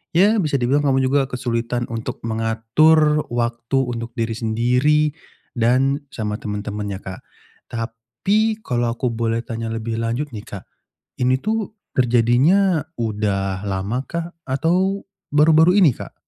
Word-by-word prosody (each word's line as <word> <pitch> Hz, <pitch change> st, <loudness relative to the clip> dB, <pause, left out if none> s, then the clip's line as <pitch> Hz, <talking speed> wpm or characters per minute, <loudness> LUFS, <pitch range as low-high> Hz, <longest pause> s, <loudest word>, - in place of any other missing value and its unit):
Ya 205 Hz, +5 st, +5 dB
bisa 145 Hz, -2 st, 0 dB
dibilang 135 Hz, +4 st, +2 dB
kamu 135 Hz, -1 st, +3 dB
juga 140 Hz, +1 st, +3 dB
kesulitan 120 Hz, -1 st, -2 dB
untuk 115 Hz, -1 st, -4 dB
mengatur 135 Hz, +8 st, +3 dB
waktu 120 Hz, +2 st, -1 dB, 0.2 s
untuk 115 Hz, 0 st, -5 dB
diri 115 Hz, -1 st, -2 dB
sendiri 125 Hz, +7 st, +2 dB, 0.5 s
dan 130 Hz, +4 st, +2 dB, 0.2 s
sama 105 Hz, -2 st, -2 dB
temen-temen 105 Hz, -1 st, -4 dB
ya, -, -, -7 dB
Kak. 95 Hz, 0 st, -7 dB, 0.5 s
Tapi 120 Hz, -, -1 dB
kalau 120 Hz, -5 st, 0 dB
aku 125 Hz, -, -1 dB
boleh 115 Hz, 0 st, -1 dB
tanya 115 Hz, -1 st, -5 dB
lebih 115 Hz, 0 st, -3 dB
lanjut 120 Hz, +6 st, -1 dB
nih, 105 Hz, -, -6 dB
Kak, 100 Hz, -3 st, -8 dB, 0.6 s
ini 130 Hz, +1 st, +3 dB
tuh 220 Hz, 0 st, -1 dB, 0.2 s
terjadinya 130 Hz, -, +3 dB, 0.2 s
udah 100 Hz, -3 st, -1 dB
lama 100 Hz, +5 st, -2 dB
kah 170 Hz, 0 st, -4 dB, 0.2 s
atau 180 Hz, +9 st, +1 dB, 0.3 s
baru-baru 160 Hz, +5 st, +5 dB
ini, 170 Hz, -8 st, +6 dB
Kak? -, -, -9 dB
120 Hz, 135 wpm, -21 LUFS, 115-150 Hz, 0.6 s, ini